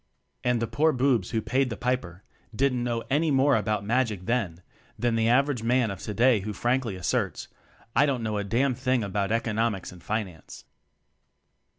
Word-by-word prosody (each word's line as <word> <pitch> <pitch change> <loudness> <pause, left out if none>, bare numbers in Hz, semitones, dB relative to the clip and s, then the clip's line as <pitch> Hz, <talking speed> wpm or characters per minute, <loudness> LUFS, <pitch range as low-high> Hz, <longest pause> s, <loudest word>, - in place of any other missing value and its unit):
And 125 -1 +2
the 115 - 0
poor 145 +8 +2
boobs 125 -7 +1
who 110 -1 -1
"paid 130 +3 +1
the 115 - -5
piper" 100 -8 -2 0.3
didn't 125 -1 +1
know 120 -1 -2
any 155 +3 +2
more 140 0 +4
about 105 -2 -1
magic 110 -5 0
then, 95 -8 -1 0.3
than 120 -1 0
the 115 0 +2
average 135 0 +2
man 120 -1 +2
of 95 - -7
today 115 +3 +2
who 105 +2 -5
frankly 120 0 0
asserts: 90 - -2 0.5
"I 145 - +5
don't 130 -4 -1
know 105 -2 -1
a - - -2
damned 120 +5 0
thing 130 -2 +1
about 100 0 -1
Econom 115 -1 0
ics 95 - -9
and 90 -1 -13
Finance." 100 -6 -5
115 Hz, 180 wpm, -26 LUFS, 105-130 Hz, 0.5 s, I